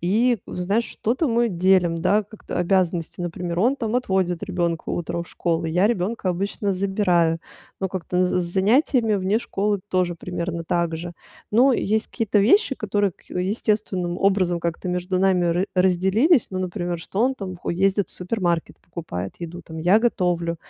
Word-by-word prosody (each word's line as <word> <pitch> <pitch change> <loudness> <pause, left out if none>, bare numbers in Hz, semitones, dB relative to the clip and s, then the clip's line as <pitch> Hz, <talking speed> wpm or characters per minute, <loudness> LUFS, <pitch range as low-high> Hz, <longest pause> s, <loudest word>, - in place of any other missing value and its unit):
и, 225 +7 +2
вот - - -7
знаешь, 200 +6 0
что-то 255 +8 -1
мы 235 +1 +2
делим, 180 -3 +2
да, 200 +5 +3
как-то 210 +2 -7
обязанности, 175 -2 0
например. 175 0 -3
Он 250 +7 +3
там 225 -4 -3
отводит 190 -7 0
ребёнка 175 -4 -2
утром 170 0 -2
в - - -18
школу, 165 -1 -1
я 175 +5 +2
ребёнка 200 -2 -1
обычно 200 +3 -1
забираю, 185 -4 +1 0.4
но 190 - 0
как-то 180 0 -1
с 180 - +2
з 180 - +1
занятиями 225 +3 +3
вне 195 +3 +1
школы 205 -3 -1
тоже 180 -2 0
примерно 170 -1 -4
так 170 -1 0
же. 170 +1 -6 0.4
Но 255 +5 +5
есть 220 -2 0
какие-то 220 -3 0
вещи, 280 - +4
которые 205 -2 0
ка - - -16
естественным 190 -2 -1
образом 190 -3 +2
как-то 170 +2 -3
между 180 +1 -1
нами 190 -2 +3
ра 175 +2 +1
разделились, 190 - +3
ну, 185 - -3
например, 175 -1 -3
что 190 +4 -4
он 260 +3 +3
там 185 -4 -6
хо - - -4
ездит 195 +3 +1
в - - -14
супермаркет, 180 -3 -2
покупает 125 - -6
еду 170 +1 -6
там, 160 0 -9
я 175 +6 +4
готовлю, 175 -7 0
185 Hz, 170 wpm, -23 LUFS, 175-210 Hz, 0.4 s, Но